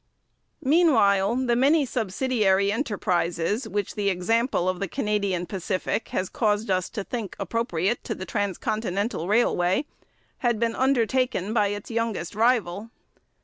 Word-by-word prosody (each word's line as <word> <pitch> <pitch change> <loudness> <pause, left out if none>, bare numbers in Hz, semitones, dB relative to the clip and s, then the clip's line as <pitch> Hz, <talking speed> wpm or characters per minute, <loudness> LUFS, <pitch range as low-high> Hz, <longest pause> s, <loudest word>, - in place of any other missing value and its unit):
Meanwhile, 250 - +3
the 240 -1 +2
many 280 +4 +4
subsidiary 210 -4 +1
enterprises, 205 - -1
which 205 -2 -2
the 205 -1 0
example 195 +1 +1
of 185 -1 -1
the 195 - -2
Canadian 200 -5 -1
Pacific 190 +3 -2
has 185 - -2
caused 210 0 0
us 185 -1 0
to 210 - -4
think 220 -3 -5
appropriate 230 -2 -1
to - - -3
the 185 - -6
transcontinental 200 0 -2
railway, 205 +1 +2 0.5
had 235 -3 +1
been 230 0 +1
undertaken 255 -5 +1
by 210 -3 +3
its 205 +2 -5
youngest 225 -7 -2
rival. 220 -2 +1
210 Hz, 130 wpm, -25 LUFS, 190-235 Hz, 0.5 s, many